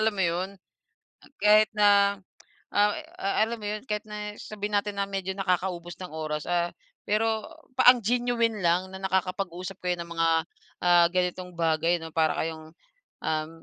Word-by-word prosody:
alam 220 -1 +2
mo 190 - +2
'yon, 175 +2 0 0.5
hmm, - - -24
kahit 210 +1 +5
na 200 -1 +5 0.6
ah 205 0 +4 0.3
ah, 195 - 0
alam 235 +1 -4
mo - - -6
'yon. 210 0 -4
Kahit 210 -4 -2
na 210 0 -5
sabihin 210 0 -5
natin 205 0 0
na 200 - +1
medyo 195 -1 -3
nakakaubos 180 -2 -1
ng 180 - -6
oras, 155 -1 -4
ah, 175 0 0 0.3
pero 220 +1 +1 0.3
pa 255 - +8
ang 245 - -5
genuine 235 -1 +1
lang 175 +2 +2
na 190 - -8
nakakapag-usap 190 -1 -2
kayo 180 0 +1
ng 170 - -8
mga, 165 0 +1 0.6
ah, 175 -1 +6
ganitong 180 0 -1
bagay, 165 +1 +1
'no? 165 - -7
Para 160 -1 +2
kayong, 160 -1 -5 0.5
um, 155 0 -1
190 Hz, 165 wpm, -27 LUFS, 170-210 Hz, 0.6 s, pa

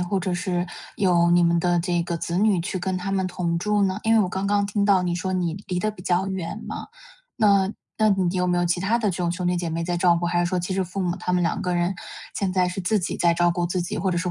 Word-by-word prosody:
或 185 +2 -1
者 185 0 -2
是 175 0 -1 0.3
有 175 -3 +3
你 175 0 +5
们 170 0 +3
的 175 0 +2
这 175 0 0
个 170 -1 -2
子 170 +2 -2
女 205 -4 +3
去 185 +2 -3
跟 185 +1 -2
他 185 +2 -3
们 190 -1 0
同 170 -2 -2
住 210 +2 +1
呢？ 190 +1 +1
因 225 0 +4
为 220 - +5
我 185 - +1
刚 190 +2 -2
刚 205 0 +2
听 200 0 0
到 195 -3 +4
你 175 -1 -1
说 185 +1 -2
你 175 -3 -1
离 180 -1 -2
得 215 - 0
比 205 - -13
较 180 +2 0
远 190 +2 -4
嘛， - - -5 0.5
那 200 -3 +3 0.3
那 215 0 +4
你 190 -2 +1
有 180 0 +1
没 175 0 +1
有 175 - +2
其 175 +1 0
他 215 +5 +2
的 210 -4 +1
这 175 - -4
种 175 -1 -1
兄 180 0 -4
弟 180 - +1
姐 170 -1 -2
妹 165 +1 -2
在 175 +1 -1
照 170 0 +4
顾， 175 0 -1
还 175 0 0
是 175 - +2
说 180 0 -1
其 180 +2 -3
实 190 0 0
父 185 +3 -5
母 175 -1 -1
他 180 - -3
们 180 -1 +2
两 - - 0
个 180 -1 -1
人 175 +2 +1 0.4
现 190 -2 -1
在 180 -1 +2
是 180 +2 -4
自 205 +3 +1
己 175 - -3
在 170 -1 +3
照 175 0 +3
顾 175 0 -1
自 180 0 -1
己， - - -4
或 190 -2 0
者 175 - 0
说 180 0 -1
180 Hz, 325 characters per minute, -24 LUFS, 175-195 Hz, 0.5 s, 你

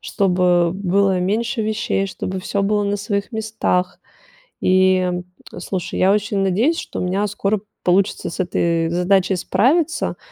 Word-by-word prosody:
чтобы 180 -3 +2
было 195 0 +1
меньше 225 +5 -1
вещей, 215 -2 -1
чтобы 190 0 -5
всё 200 +2 -2
было 205 +1 +1
на 200 0 -1
своих 205 +2 -3
местах. 220 -4 -1 0.6
И, 185 0 +4
м, 180 -1 -2 0.3
слушай, 180 0 -4
я 190 +2 +4
очень 205 -1 0
надеюсь, 220 - +1
что - - -5
у - - -2
меня 190 +3 0
скоро 205 0 -1 0.2
получится 185 +2 +1
с 170 - -6
этой 170 -2 0
задачей 185 +2 +2
справиться. 270 - +1
195 Hz, 145 wpm, -20 LUFS, 180-210 Hz, 0.6 s, И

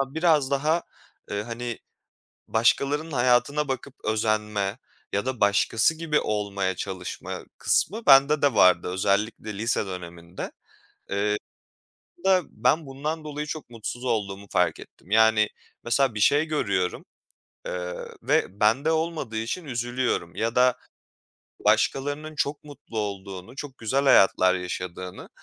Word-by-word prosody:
Ya, 135 +1 -2
biraz 160 -5 +3
daha, 155 +5 +1 0.5
ııı, 105 0 -2
hani, 120 +1 -5 0.7
başkalarının 145 +7 +2
hayatına 130 +4 +2
bakıp 135 0 -4
özenme 105 -1 0 0.3
ya 100 +4 -1
da 130 -3 -3
başkası 105 +7 +3
gibi 160 -2 0
olmaya 100 -3 -1
çalışma 95 -1 -5
kısmı 220 +3 +1
bende 140 +2 +6
de 140 -4 +3
vardı. 90 -4 +5
Özellikle 100 +3 -1
lise 115 -2 0
döneminde. 85 -1 -7 0.6
Iıı, 105 +1 +1 0.9
aslında 190 -2 +4
ben 160 -2 +1
bundan 150 +4 -4
dolayı 150 0 -4
çok 150 -4 -6
mutsuz 120 +2 -6
olduğumu 100 -4 -2
fark 90 - +1
ettim. 90 - -16
Yani, 110 0 +5 0.4
mesela, 120 0 +2
bir 105 - -3
şey 145 +8 +4
görüyorum, 100 - -1 0.6
ııı, 90 0 -5
ve 100 +3 +1
bende 130 +9 +3
olmadığı 160 -8 -2
için 120 +10 -3
üzülüyorum 120 0 -2
ya 115 +1 -1
da 125 0 +4 0.9
başkalarının 145 +3 +1
çok 150 0 -2
mutlu 140 -6 -8
olduğunu, 100 +2 -5
çok 135 -2 -7
güzel 130 +5 0
hayatlar 95 -7 +5
yaşadığını, 90 0 -5
115 Hz, 125 wpm, -25 LUFS, 100-145 Hz, 0.9 s, bende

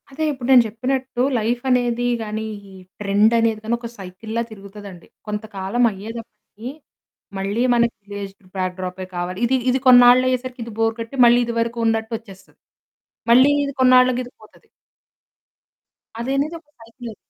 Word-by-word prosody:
అదే 285 +3 -5
ఇప్పుడు 260 -4 -6
నేను 250 -2 +8
చెప్పినట్టు 255 +3 -3 0.2
లైఫనేది 245 +1 0
గానీ 220 0 -4 0.3
ఈ - - -14 0.3
ట్రెండనేది 220 +2 +2
గాని 225 +2 0
ఒక 235 -1 -7
సైకిళ్ళా 205 +4 -5
తిరుగుతదండి. 200 -3 -11 0.2
కొంతకాలం 210 +1 -3
అయ్యేదప్పటికి 220 +2 -10 0.7
మళ్ళీ 200 +4 -2
మనకి 235 -1 +2 0.2
విలెజ్డ్ 200 -1 -8
బ్యాక్ 185 -1 -2
డ్రాపే 185 0 -5
కావాలి. 175 +2 -4
ఇది, 260 +2 +2
ఇది 255 +1 +1
కొన్నాళ్ళయ్యేసరికిది 250 -1 +4
బోర్ 225 0 +1
కొట్టి 230 +4 -6
మళ్ళీ 240 0 +6
ఇది 235 - -4
వరకున్నట్టు 230 -1 -1
వచ్చేస్తది. 195 -4 -17 0.7
మళ్ళీ 255 +4 +7 0.2
ఇది 280 - -5
కొన్నాళ్ళకిదిపోతది. 255 -1 +1 1.5
అదనేది 275 +6 -1
ఒక 310 -2 -35
సైకిల్. 230 0 -11
230 Hz, 120 wpm, -21 LUFS, 210-250 Hz, 1.5 s, నేను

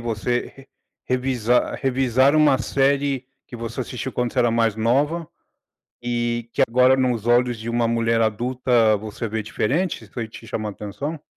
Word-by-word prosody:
Você 120 +1 -2
re 135 0 -15 0.4
revisar 125 -2 0
revisar 130 +1 +2
uma 150 -3 +4
série 135 +1 0 0.2
que 120 - -9
você 115 +2 -5
assistiu 125 +1 -5
quando 125 -1 -1
você - - -3
era 120 -1 +4
mais 115 -2 +1
nova 145 +9 +1 0.7
e 120 -1 -2
que - - +1
agora, 125 +3 +4
nos 125 -4 0
olhos 120 0 +3
de 110 +1 -5
uma 120 0 +1
mulher 115 0 +1
adulta, 115 0 +2
você 110 +2 -5
vê 110 +1 -3
diferentes? 115 - -2
Foi 115 +2 -5
te 115 +1 -12
chamou 110 -1 -3
a - - -5
atenção? 125 +11 -6
120 Hz, 165 wpm, -22 LUFS, 115-130 Hz, 0.7 s, uma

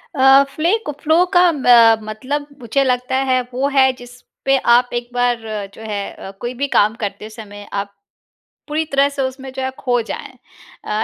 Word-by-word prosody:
अ, 270 +1 +6
flu 335 +10 +1
को 295 - -3
flow 320 +3 +3
का 360 0 +6
अ, 240 -6 +5
मतलब 260 +7 -4
मुझे 250 +3 0
लगता 250 0 -1
है 255 0 +3
वो 265 +3 0
है, 265 -2 +4
जिस 245 0 -14 0.2
पे 270 0 +4
आप 245 -1 +3
एक 240 0 -3
बार 245 -1 +1 0.3
जो - - -13
है 205 -2 -4
अ, 195 - -10
कोई 240 +1 -4
भी 280 +3 -2
काम 215 -4 +2
करते 210 +1 -5
समय 205 -2 -11
आप, 200 0 -4 0.8
पूरी 305 +2 -1
तरह 280 -2 +2
से 280 -1 -4
उसमें 265 0 -5
जो 265 - -5
है 260 - -1
खो 245 -2 0
जाएँ। - - -6 0.5
अ, - - -8
255 Hz, 190 wpm, -18 LUFS, 235-275 Hz, 0.8 s, अ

